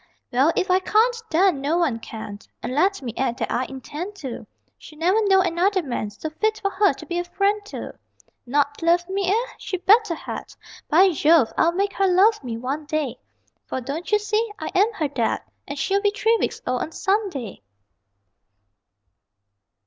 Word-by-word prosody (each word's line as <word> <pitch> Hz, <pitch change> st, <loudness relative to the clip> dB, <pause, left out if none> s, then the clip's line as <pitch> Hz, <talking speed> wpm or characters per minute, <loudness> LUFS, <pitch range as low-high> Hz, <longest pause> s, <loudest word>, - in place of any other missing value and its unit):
Well, 270 Hz, +6 st, +4 dB
if 370 Hz, -, 0 dB
I 370 Hz, -, +5 dB
can't 445 Hz, +5 st, +3 dB
then 345 Hz, -3 st, +3 dB
no 300 Hz, +5 st, +1 dB
one 295 Hz, -10 st, +1 dB
can 215 Hz, -2 st, -8 dB, 0.2 s
And 240 Hz, -, -3 dB
let 375 Hz, +3 st, +1 dB
me 235 Hz, -3 st, -4 dB
add 250 Hz, -2 st, -1 dB
that -, -, -3 dB
I 255 Hz, -, 0 dB
intend 295 Hz, +9 st, -7 dB
to: 265 Hz, -10 st, -7 dB, 0.3 s
She'll 305 Hz, -, -14 dB
never 370 Hz, +7 st, +2 dB
know 385 Hz, -1 st, +5 dB
another 370 Hz, +2 st, +1 dB
man 240 Hz, -6 st, -3 dB
So 305 Hz, +10 st, -7 dB
fit 435 Hz, +7 st, 0 dB
for 395 Hz, -, -1 dB
her 400 Hz, +1 st, +3 dB
to -, -, -11 dB
be 345 Hz, -1 st, -2 dB
a -, -, -1 dB
friend 400 Hz, +4 st, 0 dB
to. 415 Hz, -, -7 dB, 0.5 s
Not 285 Hz, +3 st, 0 dB
love 345 Hz, +1 st, +3 dB
me, 385 Hz, -1 st, -1 dB
eh? 460 Hz, +5 st, +1 dB
She 370 Hz, -, -3 dB
better 410 Hz, 0 st, +4 dB
had! -, -, -7 dB, 0.3 s
By 370 Hz, +5 st, +6 dB
Jove, 310 Hz, -5 st, +4 dB
I'll 335 Hz, -, +3 dB
make 395 Hz, +2 st, 0 dB
her 390 Hz, -, +2 dB
love 390 Hz, +2 st, +4 dB
me 235 Hz, -3 st, -4 dB
one 275 Hz, +5 st, -4 dB
day; 300 Hz, -5 st, -2 dB, 0.5 s
For, -, -, -3 dB
don't 280 Hz, -, -5 dB
you 420 Hz, -, +6 dB
see, 425 Hz, +1 st, -1 dB
I 315 Hz, -, -5 dB
am 410 Hz, +5 st, +3 dB
her 320 Hz, -8 st, -1 dB
Dad, 250 Hz, -5 st, -1 dB, 0.2 s
And 285 Hz, -, -5 dB
she'll 395 Hz, +7 st, +1 dB
be 410 Hz, -, +3 dB
three 430 Hz, +3 st, +2 dB
weeks -, -, -2 dB
old 250 Hz, 0 st, -1 dB
on 315 Hz, -, -4 dB
Sunday! 380 Hz, -, -2 dB
345 Hz, 185 wpm, -23 LUFS, 280-395 Hz, 0.5 s, By